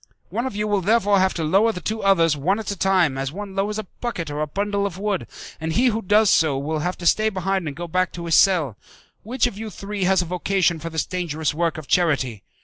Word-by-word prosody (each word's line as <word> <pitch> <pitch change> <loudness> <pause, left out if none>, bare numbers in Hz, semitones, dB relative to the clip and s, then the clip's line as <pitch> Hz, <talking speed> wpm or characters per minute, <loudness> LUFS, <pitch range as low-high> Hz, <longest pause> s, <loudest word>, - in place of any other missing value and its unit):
One 240 +3 -1
of 260 - -6
you 210 +1 -1
will 205 -2 +1
therefore 205 0 +3
have 190 0 +2
to 165 - -2
lower 195 +8 +3
the 180 - -6
two 220 +5 -3
others 165 -6 +3
one 175 +8 0
at 220 -2 -4
a - - -3
time 180 -8 +2
as 135 0 -2
one 200 +3 -7
lowers 205 +2 -1
a 215 - -3 0.2
bucket 175 -11 -4
or 145 +1 -3
a 155 - -1
bundle 200 +4 -1
of 180 -3 -8
wood, 200 -1 -2 0.3
and 160 0 -3
he 250 +6 +3
who 225 - -2
does 210 +1 +4
so 155 -4 +3
will 155 +3 -2
have 180 +4 -2
to 175 - -8
stay 215 +5 +3
behind 190 -2 -2
and 145 - -6
go 175 0 -5
back 185 +2 0
to 170 -1 -6
his 165 - -1
cell. 160 - +4 0.4
Which 240 +3 0
of 215 -4 -3
you 220 0 -5
three 200 -1 -4
has 190 -1 +3
a - - -6
vocation 180 0 0
for 165 +2 -5
this 160 -3 -2
dangerous 160 -6 -2
work 165 +1 -1
of 155 -3 -8
charity? 140 - +1
185 Hz, 255 wpm, -22 LUFS, 160-205 Hz, 0.4 s, does